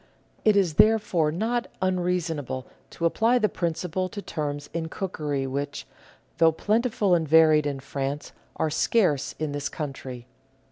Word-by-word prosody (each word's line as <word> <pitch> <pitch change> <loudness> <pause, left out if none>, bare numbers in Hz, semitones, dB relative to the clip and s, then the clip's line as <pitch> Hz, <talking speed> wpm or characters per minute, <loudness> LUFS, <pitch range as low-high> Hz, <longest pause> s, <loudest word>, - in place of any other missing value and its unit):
It 215 -1 +5
is 185 -5 +2
therefore 210 -8 +2
not 230 +8 -1
unreason 180 -3 0
able 130 -1 -5 0.2
to 170 - -4
apply 225 +8 +3
the 215 -3 +3
principle 180 +1 -2
to 205 - -7
terms 145 -6 -4
in 165 -1 -2
cookery 150 -8 -3
which, 140 +2 -4 0.5
though 165 -1 +6
plentiful 215 +2 +1
and 165 -2 +2
varied 155 -1 +6
in 140 -2 -3
France, 140 +1 -4 0.2
are 155 - 0
scarce 155 - +1
in 155 -2 -2
this 145 0 -3
country. 130 -5 -6
160 Hz, 145 wpm, -26 LUFS, 145-190 Hz, 0.5 s, though